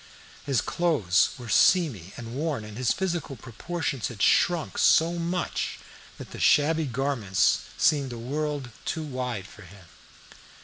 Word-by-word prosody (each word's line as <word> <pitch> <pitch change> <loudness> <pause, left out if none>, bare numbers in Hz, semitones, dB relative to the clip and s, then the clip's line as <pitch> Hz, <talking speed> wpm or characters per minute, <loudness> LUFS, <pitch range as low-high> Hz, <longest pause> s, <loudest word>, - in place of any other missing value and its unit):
His 135 -5 +2
clothes 115 - +2
were 125 -2 -9
seamy 115 - +3
and 115 -1 -8
worn, 145 -5 -2
and 105 -1 -10
his 125 0 0
physical 175 -7 -2
proportions 135 +3 -4
had 120 -5 -9
shrunk 170 +7 +2
so 170 +2 +4
much 175 +2 -2 0.4
that - - -10
the - - -8
shabby 155 +1 +3
garments 125 -7 +1 0.2
seemed 140 -4 +2
a 120 - -6
world 140 +1 -3
too 160 - -3
wide 125 -8 -4
for 100 - -14
him. 95 0 -15
135 Hz, 140 wpm, -26 LUFS, 115-160 Hz, 0.4 s, so